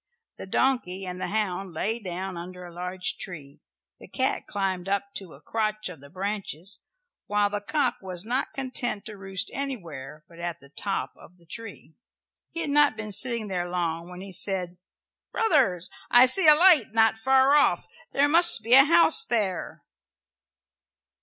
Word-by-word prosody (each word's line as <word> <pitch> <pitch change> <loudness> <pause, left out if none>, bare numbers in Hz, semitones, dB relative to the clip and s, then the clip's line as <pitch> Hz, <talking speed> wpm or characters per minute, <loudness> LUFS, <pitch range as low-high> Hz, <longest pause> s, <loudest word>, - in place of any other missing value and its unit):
The - - -8
donkey 195 -5 0
and 180 0 -6
the - - -2
hound 195 -3 -2
lay 220 +8 -2
down 190 -2 -5
under 180 +1 -8
a 175 - -11
large 180 +1 -3
tree, 145 -6 -8 0.4
the - - -13
cat - - -2
climbed 195 -2 -3
up 200 0 -2
to 185 -7 -9
a 140 - -18
crotch 215 +3 -2
of 165 -7 -11
the 140 - -14
branches, 195 0 -3 0.5
while 205 -1 +1
the 205 0 -3
cock 250 +3 0
was 185 -1 -6
not 250 +4 -1
content 250 -5 -3
to 215 - -8
roost 195 +1 -3
anywhere 160 - -6
but 170 0 -16
at 170 -1 -4
the 140 - -18
top 195 +6 -3
of 180 - -18
the 170 - -24
tree. 205 -3 -10 0.6
He 335 - -5
had 305 -3 -3
not 290 -5 +4
been 215 -1 -6
sitting 230 +1 0
there 175 -2 -3
long 170 -1 -3
when 180 0 -9
he 195 0 -9
said, 180 -1 -1 0.5
"Brothers, 265 - +1 0.2
I 245 +1 +7
see 315 +7 +3
a 305 - +10
light 310 - +5
not 225 0 +4
far 265 +4 +3
off. 295 - +3 0.3
There 280 +1 +3
must 335 -5 +5
be 230 +2 +1
a 270 +1 +9
house 335 +6 +6
there." 205 - -2
200 Hz, 170 wpm, -26 LUFS, 180-245 Hz, 0.6 s, a